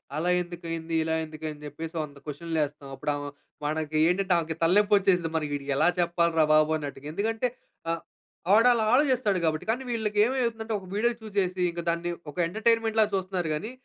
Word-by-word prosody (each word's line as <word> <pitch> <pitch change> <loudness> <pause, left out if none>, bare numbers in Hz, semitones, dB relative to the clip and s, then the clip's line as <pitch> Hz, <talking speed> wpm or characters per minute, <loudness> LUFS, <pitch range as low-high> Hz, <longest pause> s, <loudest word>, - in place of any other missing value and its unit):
అలా 165 +4 0
ఎందుకైంది? 165 -2 -5
ఇలా 160 0 0
ఎందుకని 155 -1 -7
జెప్పేసి 160 +3 -7
వంద 145 -1 -10
క్వెషన్‌లేస్తాం. 150 -2 -3
అప్పుడు 145 +2 -2
ఆమ 145 - -5 0.4
మనకేంటంటే, 160 +5 +1
ఆమెకి 160 -1 -4
తలనొప్పి 205 +5 +4
వచ్చేసిద్ది, 180 -4 +2
మనం 150 - -1
వీడికి 140 0 -3
ఎలా 160 +4 +4
చెప్పాలి 170 -1 +2
రా 155 - +6
బాబు! 155 0 +4
అన్నట్టుగా. 145 -1 -7
ఎందుకంటే 225 +6 0 0.4
ఆహ్, 165 -1 -2 0.5
వాడు 225 +4 +6
అలా 230 - +1
ఆలోచిస్తాడు 255 -8 +3
గాబట్టి. 155 -1 0
కానీ 250 +4 -2
వీళ్ళకి 215 -3 -1
ఏమైతుందంటే, 230 -3 -1
ఒక 190 - -13
వీడియో 235 +3 +2
చూసేసి. 190 -3 -1
ఇంక 170 - -6
దాన్ని 170 +1 -1 0.2
ఒక 145 - -22
ఎంటర్టైన్‌మెంట్‌ 225 +3 +1
లాగా 215 -1 +2
చూస్తున్నారు 185 -3 -2
గానీ, 215 +10 -5
175 Hz, 170 wpm, -27 LUFS, 155-210 Hz, 0.5 s, రా